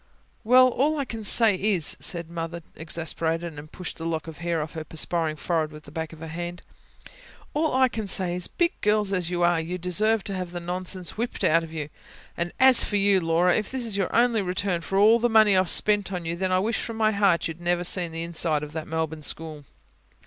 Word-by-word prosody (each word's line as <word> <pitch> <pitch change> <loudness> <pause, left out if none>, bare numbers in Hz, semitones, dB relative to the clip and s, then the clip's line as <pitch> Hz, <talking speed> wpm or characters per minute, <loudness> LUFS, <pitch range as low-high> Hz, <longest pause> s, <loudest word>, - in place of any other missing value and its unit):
"Well, 255 +3 +6
all 295 +5 +1
I 280 - -1
can 225 -3 -7
say 220 +1 +4
is," 190 -4 0
said 170 -2 -2
Mother 170 0 -6
exasperated, 165 0 -3
and 150 +1 -12
pushed 180 -2 -7
a - - -6
lock 165 -1 -2
of 160 - -9
hair 170 -1 -1
off 150 - -9
her 160 - -5
perspiring 160 0 -1
forehead 160 -1 -1
with 150 0 -12
the 145 - -14
back 160 +1 -5
of 160 -1 -13
her 165 - -6
hand. 175 +2 -6 0.9
"All 305 -1 0
I 260 0 +5
say 195 -6 0
is, 180 -1 +1
big 345 -1 +1
girls 210 -1 +2
as 180 -3 -1
you 175 -1 -1
are, 175 -1 +3
you 175 +3 -4
deserve 205 +5 +1
to 200 - -5
have 180 -2 -5
the 175 - -4
nonsense 180 +1 -4
whipped 235 +2 -3
out 165 +2 +4
of 160 - -9
you. 155 -2 -5 0.7
As 260 -2 +6
for 205 - -1
you, 200 -1 +4
Laura, 170 +2 +2
if 215 -2 -1
this 260 -2 -3
is 220 -3 -1
your 195 -2 0
only 235 -2 +3
return 180 -1 -1
for 195 +3 -3
all 220 +4 +6
the 240 +1 +1
money 215 -3 +5
I've 185 -2 +2
spent 205 -2 +3
on 180 -3 -4
you, 165 +1 -2
then 185 +1 -2
I 185 - +3
wish 220 +5 0
from 230 -1 -6
my 215 -1 +3
heart 195 -6 +2
you'd 165 +1 -8
never 175 0 0
seen 175 -1 0
the 165 +1 -4
inside 165 -3 +1
of 150 0 -8
that 160 -1 -5
Melbourne 160 -1 -3
school." 155 -1 -3
175 Hz, 230 wpm, -25 LUFS, 165-210 Hz, 0.9 s, Well